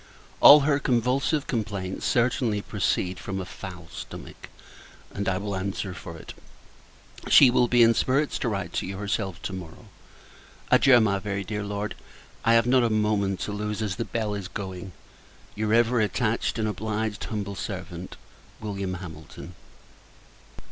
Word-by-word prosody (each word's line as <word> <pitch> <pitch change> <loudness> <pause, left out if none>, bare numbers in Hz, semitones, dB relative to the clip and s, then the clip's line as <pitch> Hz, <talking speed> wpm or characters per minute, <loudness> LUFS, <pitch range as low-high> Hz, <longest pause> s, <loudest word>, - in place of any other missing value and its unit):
All 150 +1 +10
her 140 0 +2
convulsive 135 +4 +1
complaints 100 -5 -3
certainly 120 -3 +1
proceed 95 -3 -1
from 95 -1 -4
a 95 - -4
foul 90 -2 -9
stomach; 90 - -9 0.6
and 100 0 -1
I 95 - 0
will 100 0 -3
answer 95 0 -3
for 85 -2 -9
it, - - -10 1.0
she 130 -3 +8
will 125 0 +3
be 120 0 +5
in 115 0 +6
spirits 135 +6 +1
to 120 - 0
write 95 -5 -3
to - - -2
you 95 0 -5
herself 100 -2 -2
to 95 - -4
morrow. 90 -4 -9 0.8
Adieu! 130 -3 +7
my 100 -3 +2
very 100 0 -3
dear 105 +2 -4
Lord. 100 0 -3 0.5
I 115 - +4
have 115 0 +4
not 130 +1 +4
a 120 - +2
moment 105 -3 0
to - - -3
lose, 105 +1 -3
as 100 -3 -3
the 115 - -1
bell 110 -2 -2
is 100 -3 -4
going. 95 -2 -6 0.6
Your 105 0 -2
ever 120 +1 +3
attached 110 +2 0
and 110 -1 0
obliged 110 +1 -3
humble 100 -2 -4
servant, 90 -3 -6 0.4
Wm. 100 -3 -4
HAMILTON. 80 0 -10
105 Hz, 155 wpm, -26 LUFS, 95-115 Hz, 1.0 s, All